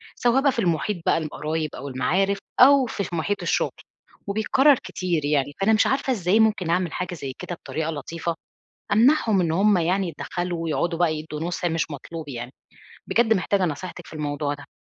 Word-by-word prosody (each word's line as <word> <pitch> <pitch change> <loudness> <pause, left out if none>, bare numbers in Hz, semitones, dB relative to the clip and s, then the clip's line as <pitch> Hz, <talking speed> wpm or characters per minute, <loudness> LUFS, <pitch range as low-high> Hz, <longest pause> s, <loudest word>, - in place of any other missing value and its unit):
سواء 245 +2 +2
بقى 280 0 +4
في 250 - -4
المُحيط 175 0 0
بقى - - +3
للقرايب 155 0 -3
أو 140 - -7
المعارِف 185 +10 +1 0.2
أو 275 +1 +7
في 215 -4 -3
في 175 - -5
مُحيط 200 +5 -1
الشُغل - - 0 0.6
وبيتكرّر 265 +8 +4
كتير 170 -5 -2
يعني، 145 -1 +1
فأنا 215 +3 +4
مش 215 - +4
عارفة 270 -1 +1
إزاي 195 -1 +2
ممكن 215 -6 +2
أعمل 175 -1 0
حاجة 180 0 -3
زي 135 -5 -6
كده 175 - -5
بطريقة 160 -1 -4
لطيفة 165 +3 -4 0.6
أمنَعهم 225 -2 +4
إن 165 -2 0
هُم 195 +4 +3
يعني 180 +3 +1
يتدخّلوا 175 0 -4
ويقعُدوا 165 +1 -1
بقى 165 -3 +2
يدّوا 155 0 -6
نُصح 175 +1 -3
مش 165 -2 -1
مطلوب 150 +2 -7
يعني، 120 -1 -6 0.6
بجد 225 -1 +3
محتاجة 190 -1 +1
نصيحتِك 175 +2 -6
في - - -12
الموضوع 145 -1 -2
ده. 145 0 -11
175 Hz, 180 wpm, -24 LUFS, 155-205 Hz, 0.6 s, أو